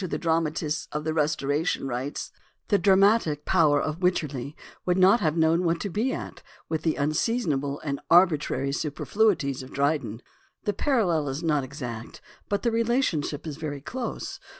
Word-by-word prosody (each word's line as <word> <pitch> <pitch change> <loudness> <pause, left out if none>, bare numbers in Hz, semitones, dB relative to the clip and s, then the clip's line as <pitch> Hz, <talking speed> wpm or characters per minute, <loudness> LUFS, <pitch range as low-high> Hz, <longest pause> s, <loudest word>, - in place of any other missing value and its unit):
xviii) 185 - -2
writes: 160 -1 -1 1.8
"The 205 - +4
dra 190 +1 +5
matic 195 -7 +3
power 155 -5 +4
of 155 +3 -3
Wycherly 150 -6 -1 0.3
would 180 0 +1
not 190 +5 +6
have 155 -3 0
known 165 +2 +3
what 165 -1 +1
to 200 - -3
be 225 +8 0
at - - -6 0.3
with 160 -1 -1
the 160 -1 0
unseasonable 145 - 0
and 140 -2 -3
arbitrary 155 -6 +3
superfluities 155 0 0
of 130 - -10
Dryden." 140 -5 -1 0.4
The 205 - 0
parallel 185 - +1
is 135 +5 -4
not 150 -4 +1
exact, 125 -4 -7 0.3
but 200 - -1
the 235 - +2
relation 230 - +1
ship 145 +1 -5
is 150 -3 -5
very 150 -3 -4
close. 245 - -5
160 Hz, 150 wpm, -26 LUFS, 145-190 Hz, 1.8 s, not